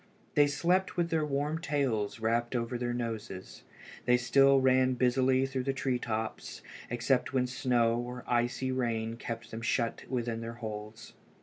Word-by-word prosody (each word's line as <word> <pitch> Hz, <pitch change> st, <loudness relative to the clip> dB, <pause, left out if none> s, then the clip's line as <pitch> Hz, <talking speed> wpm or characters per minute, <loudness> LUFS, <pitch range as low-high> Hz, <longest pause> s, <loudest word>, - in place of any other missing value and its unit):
They 145 Hz, 0 st, +5 dB
slept 175 Hz, +8 st, +1 dB
with 170 Hz, -1 st, 0 dB
their 160 Hz, -1 st, +2 dB
warm 150 Hz, +2 st, -1 dB
tails 130 Hz, -9 st, -1 dB
wrapped 120 Hz, +2 st, 0 dB
over 120 Hz, +1 st, -1 dB
their 120 Hz, 0 st, -1 dB
noses. 115 Hz, -5 st, -5 dB, 0.4 s
They 125 Hz, +1 st, +5 dB
still 135 Hz, +3 st, +5 dB
ran 130 Hz, -1 st, +3 dB
busily 130 Hz, +1 st, +3 dB
through 130 Hz, -1 st, -3 dB
the 135 Hz, -, +1 dB
tree 130 Hz, -2 st, -1 dB
tops, 110 Hz, -1 st, -4 dB, 0.3 s
except 125 Hz, +3 st, +1 dB
when 130 Hz, -1 st, +2 dB
snow 120 Hz, -2 st, +1 dB
or 125 Hz, 0 st, -5 dB
icy 120 Hz, +2 st, 0 dB
rain 115 Hz, -3 st, -1 dB
kept 115 Hz, 0 st, -6 dB
them 110 Hz, -, -5 dB
shut 115 Hz, 0 st, -1 dB
within 120 Hz, -3 st, -2 dB
their 115 Hz, 0 st, -5 dB
holes. 110 Hz, -1 st, -7 dB
125 Hz, 160 wpm, -31 LUFS, 115-135 Hz, 0.4 s, They